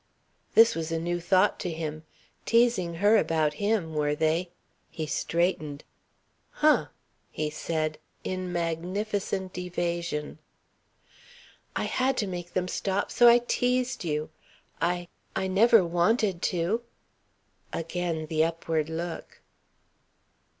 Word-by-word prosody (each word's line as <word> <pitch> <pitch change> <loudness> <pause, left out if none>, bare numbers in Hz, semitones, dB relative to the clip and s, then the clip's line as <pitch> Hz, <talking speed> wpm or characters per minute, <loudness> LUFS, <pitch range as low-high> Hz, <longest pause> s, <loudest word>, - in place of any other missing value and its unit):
This 230 0 +7
was 165 0 -4
a 165 - 0
new 175 +1 -1
thought 185 +3 +3
to 180 - -3
him. 155 -1 -5 0.4
Teasing 230 -8 +2
her 205 +5 +5
about 155 -6 +1
him, 200 -6 0
were 150 -1 +1
they? 160 +4 +1 0.4
He 160 - -4
straightened. 155 -1 -1 0.7
"Huh!" 305 0 +3 0.4
he 155 -1 -3
said, 155 0 -2 0.2
in 185 -1 -3
magnificent 185 +3 -2
evasion. 170 -4 -3 1.4
"I - - 0
had 260 +1 0
to 215 - +1
make 175 -2 -6
them 185 0 0
stop, 195 +2 -1
so 240 - +6
I 240 +1 +6
teased 250 -1 0
you. 155 -1 -2 0.5
I 175 +1 0 0.3
I - - 0
never 205 +2 +5
wanted 175 +2 +1
to." 180 +6 0 0.9
Again 165 -1 -2
the 155 0 +1
upward 165 -1 -1
look. 165 +1 -6
175 Hz, 115 wpm, -27 LUFS, 160-200 Hz, 1.4 s, This